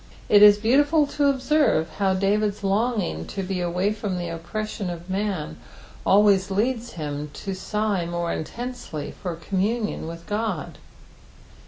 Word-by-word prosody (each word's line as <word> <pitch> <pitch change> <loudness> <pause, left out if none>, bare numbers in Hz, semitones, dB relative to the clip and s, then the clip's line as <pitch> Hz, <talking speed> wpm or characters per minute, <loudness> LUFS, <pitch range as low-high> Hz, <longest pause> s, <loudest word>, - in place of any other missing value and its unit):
It 205 -1 +7
is 205 0 +9
beautiful 290 +8 +3
to 285 0 +1
observe 275 - +2
how 190 -1 +2
David's 205 +2 0
longing 200 - 0
to 195 - -4
be 185 -1 -2
away 180 +4 0
from 205 -3 -3
the 175 -1 -3
oppression 200 +4 -4
of 175 +1 -7
man 195 - -2 0.5
always 195 -1 +5
leads 235 +4 -1
him 150 -2 -4
to 195 - -5
sigh 200 -1 -1
more 170 0 -2
intensely 235 - -5
for 180 -4 -5
communion 200 +4 -2
with 170 0 -8
God. 210 -5 -3
200 Hz, 140 wpm, -24 LUFS, 175-215 Hz, 0.5 s, is